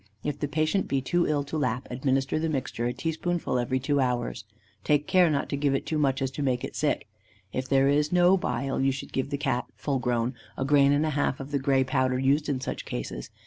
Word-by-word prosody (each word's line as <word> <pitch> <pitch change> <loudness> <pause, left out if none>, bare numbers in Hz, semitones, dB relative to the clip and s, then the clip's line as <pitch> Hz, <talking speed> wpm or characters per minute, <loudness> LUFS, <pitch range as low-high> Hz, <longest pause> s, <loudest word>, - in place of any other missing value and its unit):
If 145 -1 -3
the 145 - -1
patient 155 +6 0
be 135 - +1
too 175 +7 +1
ill 145 -2 +1
to 155 +2 -4
lap, 125 -2 -1
administer 135 +3 0
the 160 +1 -1
mixture 130 -4 -2
a - - 0
teaspoonful 165 -1 -2
every 130 +2 0
two 140 +2 0
hours. 120 -4 -1 0.4
Take 150 0 +2
care 180 0 +4
not 145 -2 0
to - - -1
give 140 -1 +1
it - - -2
too 155 - -1
much 135 -2 +2
so 140 - -1
as 130 - -1
to 145 - -5
make 130 -3 0
it - - -5
sick. - - 0 0.5
If 130 0 -3
there 135 0 +4
is 150 +1 +2
no 180 +1 +5
bile, 135 -6 -1
you 135 0 +3
should 135 - -7
give 130 - -1
the 140 - -2
Cat 135 -4 -1
(full 140 -3 -1
grown) 120 0 0 0.2
a 135 - -1
grain 140 0 +5
and 145 +2 +2
a 155 - 0
half 140 -2 0
of 135 +1 -7
the 140 - +1
grey 135 0 +2
powder 130 0 +1
used 140 +3 +2
in 135 -3 0
such 130 - -4
cases. - - -5
140 Hz, 245 wpm, -27 LUFS, 130-150 Hz, 0.5 s, no